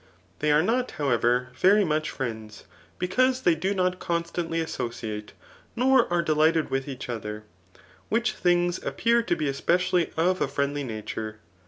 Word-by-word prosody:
They 150 0 +2
are 150 +2 +4
not, 245 +5 +1
however, 125 -2 +1
very 200 +8 +4
much 155 -1 0
friends, 110 -5 -6 0.3
because 255 +8 +1
they 175 - +5
do 190 +5 -1
not 180 -1 0
constantly 170 0 -2
associate, 115 -8 -4 0.4
nor 255 -3 +3
are 175 -1 +2
delighted 155 +1 +2
with 135 +1 -1
each 135 -2 -6
other; 105 -3 -5 0.7
which 235 +2 +1
things 175 0 +1
appear 235 +1 +2
to 230 - 0
be 155 - -2
especially 175 +5 +1
of 180 +3 +2
a - - +2
friendly 140 +1 -1
nature. 110 -2 -5
160 Hz, 150 wpm, -26 LUFS, 130-185 Hz, 0.7 s, they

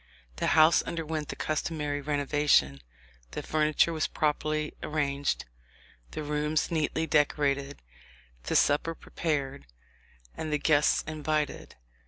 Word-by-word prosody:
The - - -1
house 155 +2 +6
underwent 160 -2 -4
the - - -5
customary 150 -2 -2
renovation; 145 - +2 0.5
the - - -4
furniture 155 +2 +2
was 155 - 0
properly 155 0 -1
arranged, 145 -2 -1 0.6
the 155 - -5
rooms 150 +2 -1
neatly 160 0 0
decorated, 145 -2 +1 0.6
the - - -1
supper 155 +3 +2
prepared, 140 - -3 0.7
and 155 -1 -4
the 150 - +2
guests 150 0 +3
invited. 155 -1 -2
150 Hz, 110 wpm, -28 LUFS, 145-155 Hz, 0.7 s, house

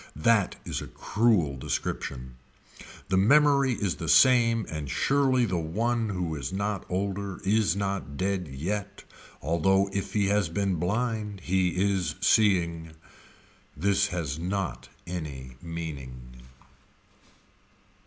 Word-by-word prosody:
That 100 +6 +2
is - - -3
a - - -7
cruel 105 -10 +1
description. 65 -2 -4 0.7
The 95 - +2
memory 140 +4 +4
is 100 -6 -2
the 80 - -4
same 115 +3 +5
and 75 -3 -5
surely 135 - +2
the 90 -5 -1
one 110 +8 -1
who 90 -4 -2
is 70 0 -4
not 100 +1 -2
older 100 +1 -3
is 100 -3 +2
not 100 -8 -3
dead 95 -1 -1
yet 95 +9 -4 0.4
although 95 +6 +2
if 100 - -3
he 105 -2 +2
has 105 -4 +2
been 95 +1 -1
blind 105 +2 -2
he 95 +1 +1
is 95 -5 0
seeing. 85 -6 +2 0.8
This 100 +4 +2
has 80 -6 -3
not 95 +2 -3 0.2
any 70 -8 -6
meaning. 65 -7 -8
95 Hz, 120 wpm, -27 LUFS, 80-105 Hz, 0.8 s, same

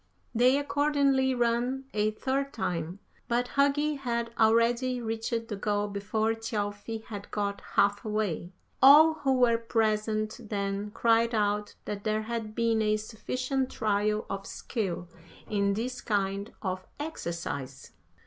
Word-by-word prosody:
"They 250 +3 +4
accordingly 280 -2 +2
ran 240 +2 0
a 210 0 +2
third 270 +5 -2
time, 175 -4 -3 0.3
but 245 +1 0
Hugi 285 +1 +2
had 235 -3 -2
already 235 +3 +3
reached 225 0 -2
the 215 - -4
goal 205 +1 -1
before 215 +2 0
Thjalfi 220 0 -4
had 205 -3 -8
got 200 -1 -2
half 205 0 +3
way. 210 -5 -2 0.3
All 300 +4 +9
who 275 -4 0
were 240 -2 +4
present 215 -1 0
then 200 0 -2
cried 230 +2 +2
out 210 0 0
that 205 -1 -5
there 215 0 0
had 220 -1 -4
been 230 -1 +2
a 215 0 +2
sufficient 255 +5 -2
trial 210 0 0
of 195 0 -5
skill 185 -7 -3 0.4
in 200 -1 +1
this 250 +4 -3
kind 200 0 -1
of 185 -1 -2 0.2
exercise. 170 - -5
220 Hz, 130 wpm, -29 LUFS, 205-245 Hz, 0.4 s, All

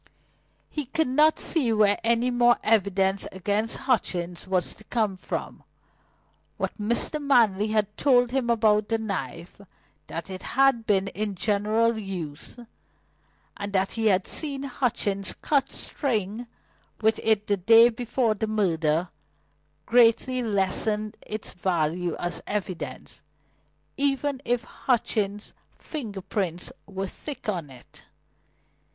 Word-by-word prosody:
He 300 -2 -3
could 315 +4 0
not 305 +4 +4
see 280 -9 +2
where 210 -2 +3
any 235 +2 +2
more 240 0 +4
evidence 195 -2 +2
against 205 +4 -1
Hutchings 180 -9 -1
was 185 -2 0
to 215 - -17
come 215 -5 0
from. 185 - -5 1.0
What - - -3
Mr. 235 +8 0
Manley 225 -8 +3
had 210 -1 0
told 245 -3 +4
him 255 -2 0
about 215 -2 +3
the 225 - +2
knife, 180 - -5 0.5
that 165 -1 -6
it 185 - -6 0.2
had 270 -4 +4
been 195 -2 +2
in 210 -1 -4
general 215 +4 +1
use, 180 -4 -6 1.0
and 200 0 -6
that 195 0 +1
he 225 -1 0
had 190 -2 +3
seen 280 -3 0
Hutchings 215 -7 0
cut 285 -2 +1
string 225 -3 -2 0.5
with 220 0 +2
it 215 -2 +2
the 205 -1 +1
day 225 +5 +7
before 240 -1 0
the 215 +1 -3
murder, 170 -5 +1 0.8
greatly 245 +2 +4
lessened 210 0 0
its 215 0 -5
value 175 -1 -1
as 175 0 -2
evidence, 190 -4 -5 0.8
even 275 -1 0
if 240 -1 0
Hutchings' 210 -5 -1 0.2
finger 220 -11 -5
prints 185 -3 -3 0.2
were 195 -1 -4
thick 275 +6 -7
on 175 -8 -2
it. 125 -2 -16
215 Hz, 125 wpm, -26 LUFS, 190-240 Hz, 1.0 s, day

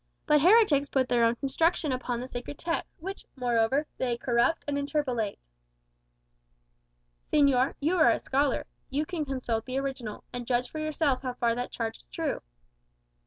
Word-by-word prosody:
But 300 -2 +4
heretics 340 -7 +5
put 260 -2 +1
their 240 -2 +3
own 230 +1 +4
construction 305 +4 +1
upon 250 -2 -2
the 250 - -5
sacred 245 +3 -6
text, 335 0 -3
which, 385 +5 -6
moreover, 245 +2 +1
they 245 -2 0
corrupt 240 +6 +1
and 290 - -1
interpolate." 280 -7 -1 1.9
"Señor, 275 -3 +4
you 325 +6 +1
are 315 - +7
a - - +3
scholar; 275 +1 0 0.2
you 290 +3 -1
can 320 -3 -3
consult 245 -5 -2
the 255 0 -3
original, 265 -6 -4
and 245 -1 -5
judge 245 0 0
for 310 - -5
yourself 310 -3 0
how 255 -2 -3
far 235 -1 +1
that 245 +1 -3
charge 225 -1 -3
is - - -22
true." - - -2
265 Hz, 165 wpm, -28 LUFS, 245-300 Hz, 1.9 s, are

